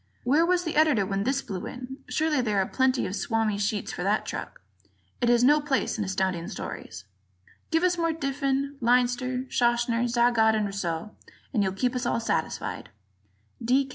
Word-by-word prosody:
Where 295 Hz, +7 st, +3 dB
was 360 Hz, 0 st, +2 dB
the 325 Hz, -3 st, -3 dB
Editor 300 Hz, -10 st, +4 dB
when 195 Hz, +1 st, -2 dB
this 270 Hz, +1 st, 0 dB
blew 185 Hz, -3 st, -5 dB
in? 255 Hz, +1 st, -7 dB
Surely 305 Hz, -3 st, +1 dB
there 210 Hz, -4 st, 0 dB
are 190 Hz, -, +3 dB
plenty 260 Hz, +3 st, +1 dB
of 185 Hz, -, -3 dB
Swami 220 Hz, -2 st, 0 dB
sheets 205 Hz, 0 st, -1 dB
for -, -, -5 dB
that -, -, +1 dB
truck; -, -, -6 dB, 0.6 s
it 240 Hz, -, +3 dB
has 240 Hz, 0 st, +4 dB
no 295 Hz, +4 st, +5 dB
place 275 Hz, -5 st, -1 dB
in -, -, +1 dB
Astounding 190 Hz, -3 st, -1 dB
Stories. 95 Hz, -, -7 dB, 0.6 s
Give 325 Hz, +1 st, +1 dB
us 360 Hz, -1 st, +2 dB
more 330 Hz, 0 st, +2 dB
of 325 Hz, 0 st, -3 dB
Diffin, 275 Hz, 0 st, -1 dB
Leinster, 250 Hz, +1 st, +1 dB
Schachner, 240 Hz, 0 st, +2 dB
Zagat 235 Hz, -2 st, +3 dB
and 215 Hz, -1 st, +1 dB
Rousseau, 195 Hz, -1 st, -3 dB, 0.4 s
and 220 Hz, -, +2 dB
you'll 190 Hz, -1 st, +1 dB
keep 250 Hz, +6 st, -1 dB
us 250 Hz, -1 st, -1 dB
all 235 Hz, -, +1 dB
satisfied. 230 Hz, -, -2 dB, 0.7 s
D. 260 Hz, +4 st, +2 dB
245 Hz, 180 wpm, -27 LUFS, 210-275 Hz, 0.7 s, no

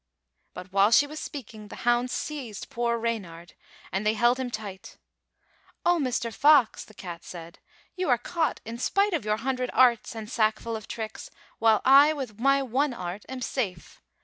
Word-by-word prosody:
'^ -, -, -54 dB
But 185 Hz, +1 st, -9 dB
while 200 Hz, +1 st, +5 dB
she 235 Hz, +5 st, +6 dB
was 305 Hz, +1 st, -8 dB
speaking 220 Hz, -6 st, -8 dB
the -, -, -10 dB
hounds 240 Hz, +1 st, +2 dB
seized 260 Hz, -9 st, -5 dB
poor 235 Hz, 0 st, 0 dB
Reynard, 190 Hz, -8 st, -4 dB, 0.4 s
and 190 Hz, +3 st, -1 dB
they 215 Hz, +1 st, +2 dB
held 240 Hz, +3 st, +3 dB
him 255 Hz, -1 st, -2 dB
tight. 205 Hz, -4 st, -8 dB, 0.9 s
"O 350 Hz, -1 st, +4 dB
Mr. 245 Hz, -4 st, -1 dB
Fox," 290 Hz, -4 st, +4 dB
the 215 Hz, -, -17 dB
cat 175 Hz, -3 st, -8 dB
said, 170 Hz, -1 st, -10 dB, 0.4 s
"you 365 Hz, -3 st, -2 dB
are 245 Hz, -, +5 dB
caught 330 Hz, +5 st, -2 dB
in 230 Hz, +2 st, -6 dB
spite 395 Hz, +9 st, +1 dB
of 310 Hz, -10 st, -1 dB
your 210 Hz, 0 st, +1 dB
hundred 255 Hz, +1 st, -2 dB
arts 240 Hz, -3 st, +3 dB
and 220 Hz, -1 st, -6 dB
sackful 220 Hz, 0 st, 0 dB
of 220 Hz, -, -7 dB
tricks, 220 Hz, -1 st, -6 dB, 0.3 s
while 225 Hz, -1 st, +4 dB
I 280 Hz, +3 st, +7 dB
with 250 Hz, -8 st, -6 dB
my 275 Hz, +2 st, +3 dB
one 265 Hz, +2 st, 0 dB
art 180 Hz, +1 st, -6 dB
am 260 Hz, -1 st, -6 dB
safe. 200 Hz, -10 st, -4 dB
235 Hz, 180 wpm, -27 LUFS, 215-265 Hz, 0.9 s, I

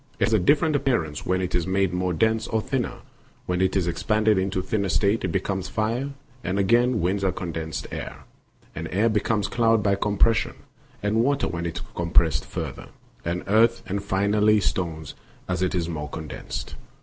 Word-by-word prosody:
It -, -, 0 dB
has 110 Hz, -, -1 dB
a 110 Hz, -, +5 dB
different 150 Hz, -, +3 dB
appearance 115 Hz, -, 0 dB
when 95 Hz, 0 st, +1 dB
it 90 Hz, -, -3 dB
is 90 Hz, 0 st, 0 dB
made 95 Hz, -1 st, +1 dB
more 90 Hz, 0 st, 0 dB
dense 110 Hz, +5 st, +1 dB
or 110 Hz, -, 0 dB
thinner; 125 Hz, +3 st, -2 dB, 0.4 s
when 90 Hz, 0 st, 0 dB
it 95 Hz, 0 st, +2 dB
is 95 Hz, -3 st, +2 dB
expanded 105 Hz, +4 st, +2 dB
into 95 Hz, 0 st, -1 dB
a -, -, -9 dB
thinner 100 Hz, -3 st, -1 dB
state 100 Hz, +6 st, +2 dB
it -, -, +1 dB
becomes 95 Hz, +2 st, -2 dB
fire, 115 Hz, +6 st, -1 dB, 0.3 s
and 90 Hz, +2 st, -1 dB
again 120 Hz, +4 st, +3 dB
winds 95 Hz, +3 st, 0 dB
are 95 Hz, -, +2 dB
condensed 80 Hz, -3 st, -4 dB
air, -, -, -6 dB, 0.5 s
and 80 Hz, +1 st, -5 dB
air 105 Hz, +5 st, +3 dB
becomes 105 Hz, -1 st, +1 dB
cloud 115 Hz, -2 st, +2 dB
by 100 Hz, -1 st, +3 dB
compression, 105 Hz, +3 st, +2 dB, 0.5 s
and 105 Hz, +2 st, +1 dB
water 135 Hz, +5 st, +2 dB
when 85 Hz, -1 st, -3 dB
it 85 Hz, -, -5 dB
is -, -, -5 dB
compressed 85 Hz, -2 st, +2 dB
farther, -, -, -6 dB, 0.4 s
and 85 Hz, +2 st, -2 dB
earth 115 Hz, +3 st, +3 dB
and 100 Hz, -1 st, -3 dB
finally 105 Hz, +2 st, +3 dB
stones 80 Hz, -6 st, -2 dB, 0.3 s
as 90 Hz, -1 st, -1 dB
it 95 Hz, 0 st, 0 dB
is 85 Hz, -2 st, 0 dB
more 75 Hz, -3 st, -4 dB
condensed. 80 Hz, -3 st, -6 dB
100 Hz, 185 wpm, -25 LUFS, 90-110 Hz, 0.5 s, a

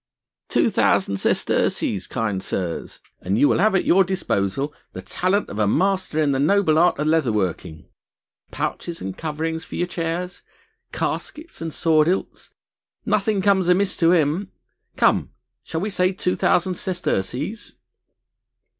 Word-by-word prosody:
"Two -, -, +2 dB
thousand 100 Hz, 0 st, +2 dB
sesterces, 95 Hz, 0 st, 0 dB
kind 105 Hz, -6 st, -2 dB
sirs, 90 Hz, -3 st, -4 dB, 0.2 s
and 95 Hz, +3 st, -1 dB
you 145 Hz, -, +5 dB
will -, -, +2 dB
have 210 Hz, +1 st, +3 dB
at 190 Hz, -, +1 dB
your 190 Hz, +2 st, +5 dB
disposal 145 Hz, -, -1 dB, 0.2 s
the -, -, -6 dB
talent 190 Hz, +3 st, 0 dB
of 105 Hz, -, -6 dB
a 105 Hz, -, +2 dB
master 185 Hz, -, +1 dB
in 150 Hz, -2 st, +2 dB
the 135 Hz, -, 0 dB
noble 160 Hz, +1 st, +3 dB
art 175 Hz, +1 st, +4 dB
of 150 Hz, -, -1 dB
leather 155 Hz, -6 st, +2 dB
working; 90 Hz, -6 st, -3 dB, 0.6 s
pouches 170 Hz, -1 st, -4 dB
and 95 Hz, 0 st, -5 dB
coverings 160 Hz, +1 st, -3 dB
for -, -, -9 dB
your 175 Hz, -, 0 dB
chairs, 175 Hz, +1 st, -4 dB, 0.5 s
caskets 315 Hz, -, -4 dB
and 165 Hz, -1 st, -3 dB
sword 155 Hz, -1 st, +2 dB
hilts, 185 Hz, +2 st, -3 dB, 0.5 s
nothing 205 Hz, -2 st, +1 dB
comes 190 Hz, -3 st, +3 dB
amiss 185 Hz, +2 st, +2 dB
to 165 Hz, -1 st, +4 dB
him.... 170 Hz, +3 st, +1 dB, 0.5 s
Come! -, -, +2 dB, 0.3 s
shall 160 Hz, +6 st, -4 dB
we 205 Hz, +2 st, -2 dB
say 185 Hz, -1 st, +2 dB
two 180 Hz, -1 st, -1 dB
thousand 180 Hz, 0 st, +1 dB
sesterces?" 155 Hz, -, -3 dB
165 Hz, 145 wpm, -22 LUFS, 135-185 Hz, 0.6 s, you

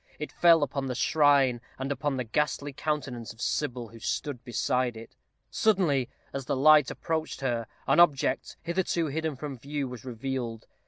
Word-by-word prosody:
It 150 Hz, -, -5 dB
fell 165 Hz, -3 st, +5 dB
upon 140 Hz, -1 st, -2 dB
the 125 Hz, -, -3 dB
shrine, 140 Hz, -3 st, +3 dB, 0.2 s
and 135 Hz, +1 st, -3 dB
upon 140 Hz, 0 st, -1 dB
the 125 Hz, -, -1 dB
ghastly 145 Hz, +3 st, -1 dB
countenance 135 Hz, -6 st, -3 dB
of 115 Hz, -, -24 dB
Sybil, 120 Hz, -1 st, -2 dB
who 115 Hz, -, -13 dB
stood 130 Hz, +2 st, -3 dB
beside 125 Hz, 0 st, 0 dB
it. 115 Hz, -, -11 dB, 0.4 s
Suddenly, 165 Hz, -, +2 dB, 0.2 s
as 135 Hz, -1 st, -4 dB
the -, -, +1 dB
light 150 Hz, +1 st, +6 dB
approached 160 Hz, -4 st, -3 dB
her, 120 Hz, -4 st, -1 dB, 0.2 s
an -, -, +3 dB
object, 150 Hz, -6 st, +3 dB
hitherto 170 Hz, -1 st, 0 dB
hidden 160 Hz, 0 st, -2 dB
from 140 Hz, -1 st, -6 dB
view, 140 Hz, +2 st, -3 dB
was 125 Hz, -3 st, -8 dB
revealed. 120 Hz, -2 st, -4 dB
135 Hz, 165 wpm, -28 LUFS, 125-150 Hz, 0.4 s, light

